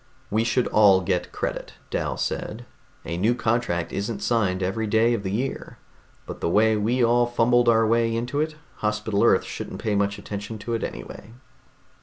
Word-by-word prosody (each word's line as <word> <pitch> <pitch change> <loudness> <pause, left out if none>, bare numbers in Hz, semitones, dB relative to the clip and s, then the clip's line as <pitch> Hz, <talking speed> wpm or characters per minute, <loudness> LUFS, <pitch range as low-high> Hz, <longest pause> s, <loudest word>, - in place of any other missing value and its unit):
"We 110 +2 +2
should 120 +2 +1
all 100 -3 +5
get 90 -1 -1
credit," - - -4 0.2
Dal - - -2
said. 120 +3 -4 0.4
"A 85 +1 -3
new 110 +7 +2
contract 110 -8 -1
isn't 100 +1 -3
signed 100 -6 +1
every 110 +4 -1
day 115 +3 +3
of 115 - -1
the 95 - -4
year. 125 +7 -3 0.5
But - - -8
the - - 0
way 110 +4 +4
we 115 +4 +1
all 120 +1 +3
fumbled 120 0 +3
our 115 -1 +4
way 115 0 +2
into 125 +5 -1
it, 155 0 -2 0.2
Hospital 105 -1 0
Earth - - +4
shouldn't - - -7
pay 110 - -1
much 100 0 0
attention 105 +2 -6
to 115 +3 -5
it 115 - -2
anyway." 100 - -7
110 Hz, 180 wpm, -24 LUFS, 100-120 Hz, 0.5 s, all